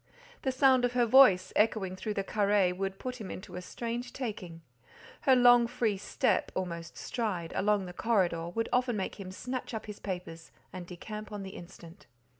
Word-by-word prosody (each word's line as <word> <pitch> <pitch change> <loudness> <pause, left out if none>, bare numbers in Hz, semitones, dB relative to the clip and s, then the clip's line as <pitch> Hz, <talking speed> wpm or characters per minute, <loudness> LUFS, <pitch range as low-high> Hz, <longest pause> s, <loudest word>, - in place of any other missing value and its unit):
The 265 - 0
sound 260 -1 +4
of 245 0 +1
her 245 -1 +3
voice, 215 -7 +6
echoing 210 -4 +1
through 210 +3 -4
the 195 - -1
carré, 200 -3 +2
would 195 0 -3
put 250 +1 -6
him 200 - -6
into 185 - -8
a 180 - -5
strange 240 +5 -5
taking; 190 -10 -6 0.7
her 260 - +8
long 245 -1 +6
free 225 -3 0
step—almost 175 -3 -2
stride—along 200 -1 -1
the 180 - -8
corridor, 175 -6 +1
would 225 +6 -2
often 245 -2 +2
make 195 - -4
him 185 -2 -7
snatch 250 +4 -5
up 220 - -5
his 210 -1 -8
papers 180 -4 -6 0.2
and 180 -1 -7
decamp 210 +4 -8
on 205 -1 -5
the 190 - -7
instant. 175 0 -12
205 Hz, 175 wpm, -30 LUFS, 185-235 Hz, 0.7 s, her